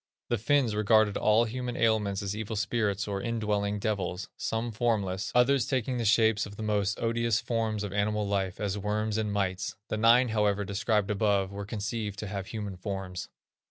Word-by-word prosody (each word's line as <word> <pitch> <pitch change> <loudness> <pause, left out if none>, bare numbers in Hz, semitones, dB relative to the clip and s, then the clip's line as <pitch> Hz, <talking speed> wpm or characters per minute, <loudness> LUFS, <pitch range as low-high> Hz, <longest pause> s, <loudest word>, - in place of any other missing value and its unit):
The 120 - +1
Finns 125 0 +2
regarded 105 0 +3
all 110 +2 +4
human 125 +2 -4
ailments 105 -3 +1
as 100 0 -3
evil 110 +1 -4
spirits 105 -2 0
or 100 -1 -2
indwelling 105 -3 -1
devils, 100 -3 -2
some 115 +1 -2
formless, 105 -4 -1
others 125 0 +4
taking 130 -1 -1
the 115 - -1
shapes 110 0 +3
of 100 - -11
the 110 - -6
most 105 -1 0
odious 115 -1 +1
forms 110 -3 -1
of 100 -2 -4
animal 105 +1 0
life, 95 -2 -1
as 105 -1 -2
worms 105 +1 -1
and 105 -1 -1
mites; 95 -2 -1
the 110 - -1
nine, 120 +3 +5
however, 105 -2 +1
described 105 +1 0
above, 100 -2 +1
were 100 0 -5
conceived 105 -1 -3
to 105 - -5
have 100 -1 -5
human 105 -4 -5
forms. 95 -2 -5
105 Hz, 180 wpm, -29 LUFS, 100-115 Hz, -, nine